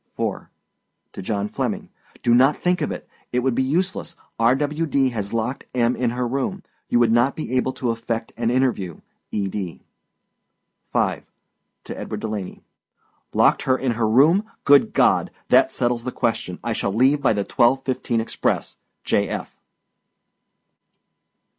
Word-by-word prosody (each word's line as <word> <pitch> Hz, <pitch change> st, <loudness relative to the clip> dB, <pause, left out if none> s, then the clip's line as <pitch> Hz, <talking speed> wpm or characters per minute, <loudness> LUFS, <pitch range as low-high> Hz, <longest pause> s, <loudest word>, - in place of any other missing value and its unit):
4. -, -, -4 dB, 0.6 s
TO -, -, -7 dB
JOHN 100 Hz, +1 st, -2 dB
FLEMMING. -, -, -3 dB, 0.3 s
Do 120 Hz, -, +4 dB
not 130 Hz, +4 st, +5 dB
think 180 Hz, 0 st, 0 dB
of -, -, -1 dB
it. -, -, -7 dB, 0.2 s
It 125 Hz, -, +1 dB
would 130 Hz, 0 st, +1 dB
be 130 Hz, -, +1 dB
useless. 170 Hz, +5 st, -1 dB, 0.2 s
R. 115 Hz, +3 st, +4 dB
W. 150 Hz, +3 st, -1 dB
D. 135 Hz, -2 st, +2 dB
has 105 Hz, -4 st, -4 dB
locked 115 Hz, +3 st, -2 dB
M. 120 Hz, 0 st, +2 dB
in 125 Hz, -2 st, 0 dB
her 125 Hz, +1 st, -2 dB
room. 140 Hz, +10 st, -2 dB, 0.3 s
You -, -, +3 dB
would 120 Hz, -2 st, +4 dB
not 120 Hz, +4 st, +3 dB
be 130 Hz, -5 st, -4 dB
able 130 Hz, +1 st, +1 dB
to 120 Hz, -3 st, -1 dB
effect 115 Hz, 0 st, -4 dB
and 115 Hz, -1 st, 0 dB
interview. 120 Hz, -, 0 dB, 0.3 s
E. 100 Hz, -2 st, -1 dB
D. 95 Hz, -3 st, -5 dB, 1.1 s
5. -, -, 0 dB, 0.6 s
TO -, -, -7 dB
EDWARD 105 Hz, -, -5 dB
DELANEY. 105 Hz, -4 st, -5 dB, 0.7 s
Locked -, -, +4 dB
her 130 Hz, 0 st, +2 dB
in 130 Hz, -2 st, 0 dB
her 115 Hz, -1 st, 0 dB
room. 155 Hz, -, +5 dB, 0.2 s
Good 140 Hz, -1 st, +5 dB
God. -, -, +3 dB, 0.2 s
That -, -, +5 dB
settles 120 Hz, -1 st, 0 dB
the 125 Hz, -, -3 dB
question. 100 Hz, -8 st, -2 dB
I 120 Hz, 0 st, -1 dB
shall 100 Hz, -, -1 dB
leave 130 Hz, +7 st, +3 dB
by 135 Hz, -, +3 dB
the 100 Hz, -1 st, -1 dB
twelve 125 Hz, +6 st, +2 dB
fifteen 125 Hz, -3 st, -1 dB
express. 115 Hz, -, -2 dB, 0.3 s
J. -, -, 0 dB
120 Hz, 160 wpm, -22 LUFS, 115-135 Hz, 1.1 s, not